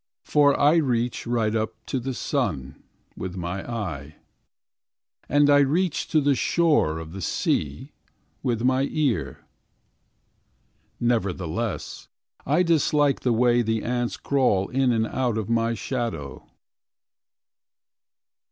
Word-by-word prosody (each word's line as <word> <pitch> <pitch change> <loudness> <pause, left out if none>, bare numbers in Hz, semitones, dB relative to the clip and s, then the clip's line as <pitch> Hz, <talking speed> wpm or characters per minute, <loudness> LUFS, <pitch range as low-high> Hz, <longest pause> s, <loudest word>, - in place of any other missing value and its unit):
For 145 -1 +3
I 150 +4 +5
reach 125 -6 0
right 115 -3 0
up 110 0 -1
to 135 - -2
the 130 +1 -4
sun. 65 - -2 0.3
With 95 0 -6
my 90 +1 -4
eye; 80 -10 -5 1.1
And 145 0 +4
I 145 0 +6
reach 160 +4 +1
to 155 - +2
the 145 -1 +3
shore 150 - +2
of 80 -1 -8
the 95 +2 -7
sea 75 - -2 0.5
With 120 -3 -1
my 130 +2 +2
ear. 115 - -1 1.5
Nevertheless, 105 -3 -2 0.4
I 155 +6 +3
dislike 150 -4 +2
The 125 - 0
way 120 +1 +3
the 115 -1 -1
ants 120 0 -2
crawl 125 -9 +1
In 130 -1 +2
and 110 -1 +1
out 120 -1 -1
of 110 -1 -3
my 115 0 +1
shadow. 115 - -4
120 Hz, 120 wpm, -24 LUFS, 100-140 Hz, 1.5 s, I